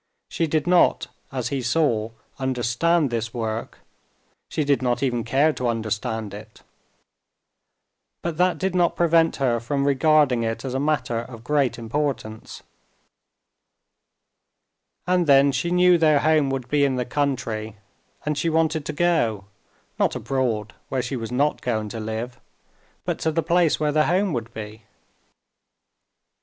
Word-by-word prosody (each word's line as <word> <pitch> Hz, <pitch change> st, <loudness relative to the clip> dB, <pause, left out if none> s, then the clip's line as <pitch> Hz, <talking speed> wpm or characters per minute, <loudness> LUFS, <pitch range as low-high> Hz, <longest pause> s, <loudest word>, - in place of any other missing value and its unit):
She 165 Hz, -, -1 dB
did 155 Hz, -1 st, 0 dB
not, 180 Hz, 0 st, +3 dB, 0.2 s
as 125 Hz, -3 st, -3 dB
he 135 Hz, -2 st, -2 dB
saw, 120 Hz, -4 st, +1 dB, 0.3 s
understand 130 Hz, +4 st, +1 dB
this 115 Hz, 0 st, -3 dB
work, 110 Hz, -1 st, -4 dB, 0.7 s
she 155 Hz, -, -1 dB
did 140 Hz, -1 st, +1 dB
not 125 Hz, 0 st, 0 dB
even 120 Hz, -3 st, 0 dB
care 140 Hz, +7 st, +2 dB
to 125 Hz, -, -2 dB
understand 110 Hz, -1 st, -2 dB
it. 105 Hz, +1 st, -12 dB, 1.6 s
But 170 Hz, -2 st, -3 dB
that 180 Hz, +1 st, +2 dB
did 190 Hz, -1 st, -1 dB
not 175 Hz, -2 st, +2 dB
prevent 165 Hz, -1 st, +3 dB
her 125 Hz, -4 st, +1 dB
from 140 Hz, +4 st, -1 dB
regarding 140 Hz, -2 st, +3 dB
it 115 Hz, +3 st, -3 dB
as 130 Hz, -, -3 dB
a 130 Hz, -, -1 dB
matter 145 Hz, -5 st, 0 dB
of 115 Hz, -1 st, -9 dB
great 135 Hz, -3 st, +1 dB
importance. 115 Hz, -2 st, -4 dB, 2.4 s
And 180 Hz, -2 st, +2 dB
then 140 Hz, 0 st, +6 dB
she 170 Hz, +5 st, -1 dB
knew 180 Hz, 0 st, +4 dB
their 155 Hz, -3 st, +4 dB
home 155 Hz, -3 st, +3 dB
would 135 Hz, -2 st, -3 dB
be 145 Hz, +2 st, +2 dB
in 135 Hz, -2 st, +2 dB
the 125 Hz, -1 st, -1 dB
country, 120 Hz, -6 st, -2 dB, 0.5 s
and 150 Hz, 0 st, 0 dB
she 155 Hz, +3 st, 0 dB
wanted 160 Hz, -1 st, 0 dB
to -, -, -3 dB
go, 145 Hz, -, +1 dB, 0.5 s
not -, -, +2 dB
abroad 120 Hz, -6 st, -2 dB, 0.2 s
where 130 Hz, -2 st, -1 dB
she 125 Hz, +3 st, -3 dB
was 115 Hz, -2 st, -5 dB
not 140 Hz, +4 st, +1 dB
going 110 Hz, -3 st, -2 dB
to 115 Hz, -, -6 dB
live, 110 Hz, +3 st, -5 dB, 0.7 s
but -, -, -2 dB
to 160 Hz, -, 0 dB
the 165 Hz, +1 st, 0 dB
place 170 Hz, 0 st, +2 dB
where 150 Hz, -1 st, +1 dB
their 155 Hz, +1 st, +2 dB
home 185 Hz, +1 st, +1 dB
would 115 Hz, -2 st, -4 dB
be. 110 Hz, 0 st, -8 dB
135 Hz, 150 wpm, -23 LUFS, 115-155 Hz, 2.4 s, then